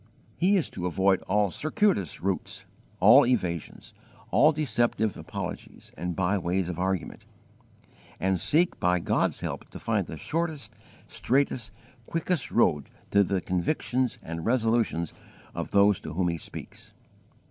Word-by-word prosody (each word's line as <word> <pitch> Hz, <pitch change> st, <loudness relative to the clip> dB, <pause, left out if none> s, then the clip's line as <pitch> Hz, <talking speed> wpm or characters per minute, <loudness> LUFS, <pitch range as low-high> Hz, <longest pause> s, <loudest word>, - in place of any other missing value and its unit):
He 195 Hz, +3 st, +3 dB
is 175 Hz, -, -1 dB
to 90 Hz, -1 st, -3 dB
avoid 95 Hz, +2 st, +2 dB
all 100 Hz, 0 st, +2 dB
circuitous 155 Hz, -, 0 dB
routes, 95 Hz, +1 st, -3 dB, 0.3 s
all -, -, +8 dB
evasions, 90 Hz, -10 st, -2 dB, 0.4 s
all 155 Hz, -, +6 dB
deceptive 120 Hz, -, 0 dB
apologies -, -, -7 dB
and 90 Hz, -1 st, -4 dB
by 95 Hz, +1 st, +1 dB
ways 90 Hz, +1 st, -1 dB
of 90 Hz, -1 st, -5 dB
argument, 95 Hz, -2 st, -2 dB, 1.0 s
and 95 Hz, -1 st, +1 dB
seek 165 Hz, -, +2 dB
by 90 Hz, 0 st, +2 dB
God's -, -, 0 dB
help -, -, -5 dB
to -, -, -9 dB
find -, -, -1 dB
the -, -, -7 dB
shortest, 155 Hz, -9 st, -3 dB, 0.3 s
straightest, 130 Hz, -3 st, 0 dB, 0.4 s
quickest 165 Hz, -2 st, -1 dB
road 75 Hz, -, +2 dB, 0.2 s
to 100 Hz, 0 st, +5 dB
the 95 Hz, -1 st, -1 dB
convictions 125 Hz, -, -1 dB
and 85 Hz, 0 st, -5 dB
resolutions 115 Hz, -8 st, +1 dB, 0.4 s
of -, -, -4 dB
those 100 Hz, -1 st, +4 dB
to -, -, -7 dB
whom 90 Hz, +1 st, +1 dB
he 85 Hz, -, -2 dB
speaks. -, -, -10 dB
100 Hz, 135 wpm, -27 LUFS, 90-130 Hz, 1.0 s, all